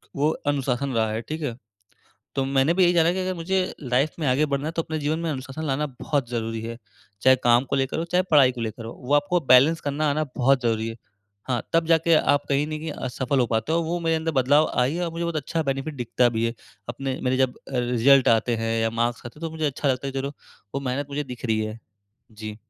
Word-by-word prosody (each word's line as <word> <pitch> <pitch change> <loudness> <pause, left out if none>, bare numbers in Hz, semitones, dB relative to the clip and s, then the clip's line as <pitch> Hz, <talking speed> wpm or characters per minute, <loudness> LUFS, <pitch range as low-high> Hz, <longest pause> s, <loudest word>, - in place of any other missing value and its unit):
वो 145 +2 +2 0.2
अनुशासन 135 -1 -1
रहा 110 -1 +1
है, 110 +1 -2
ठीक 155 +7 -6
है। 125 -6 -3 0.8
तो 135 - 0
मैंने 135 +5 +3
भी 185 0 +4
यही 175 - +4
जाना 170 0 +4
कि 190 - -3
अगर 185 0 -2
मुझे 180 +3 -1 0.2
लाइफ 130 +4 +1
में 150 - 0
आगे 140 +4 +2
बढ़ना 140 +1 -1
है 160 - -2
तो 165 - +1
अपने 160 0 -4
जीवन 150 +2 -1
में - - 0
अनुशासन 140 +2 -5
लाना 150 +3 0
बहुत 140 -6 -1
ज़रूरी 115 -1 -3
है। 115 +1 -6 0.4
चाहे 130 0 +6
काम 120 +1 +5
को - - +3
लेकर 135 +3 -1
हो, 165 - -1
चाहे 180 +2 +1
पढ़ाई 140 -5 +6
को 125 - -8
लेकर 115 0 -4
हो, 115 - -6
वो 130 +3 -2
आपको 145 +5 +2
बैलेंस 145 +6 +6
करना 145 +2 0
आना 155 +2 0
बहुत 130 0 +3
ज़रूरी 115 -1 0
है। 115 - -6 0.5
हाँ, 120 -3 0
तब 165 0 +2
जाके 165 0 +4 0.2
आप 145 - +1
कहीं 140 +1 +1
नहीं 155 0 -5
कि 160 - -5
अ, 130 - -4
सफल 130 +2 -1
हो 120 - +3
पाते 110 +6 -1
हो। 165 - +3
वो 170 +2 -2
मेरे 165 -1 +1
अंदर 160 0 -2
बदलाव 145 +4 +4 0.2
आई 135 - -1
है 175 +1 -1
और 170 - -3
मुझे 170 +1 -3
बहुत 170 -1 -2
अच्छा 160 +2 -2
बेनिफिट 135 +3 -4
दिखता 120 0 +2
भी 115 - +1
है। 115 - -3 0.3
अपने 130 +2 -3
मेरे 130 0 +1
जब 130 -1 +1
अ, - - -11
रिज़ल्ट 125 +2 +4
आते 120 +1 -2
हैं, 115 0 -1
या 115 - +1
मार्क्स 120 0 -1
आते 120 - -11
हैं, - - -14
तो - - -11
मुझे 160 -1 -1
अच्छा 140 0 -1
लगता 130 +1 0
है 135 - -4
कि 135 - -2
चलो 140 +1 -4 0.4
वो 140 - -1
मेहनत 140 +3 -2
मुझे 145 +1 -2
दिख 120 - -15
रही 110 -1 +1
है। 110 +1 -4 0.5
जी। 105 0 -7
135 Hz, 255 wpm, -24 LUFS, 120-155 Hz, 0.8 s, चाहे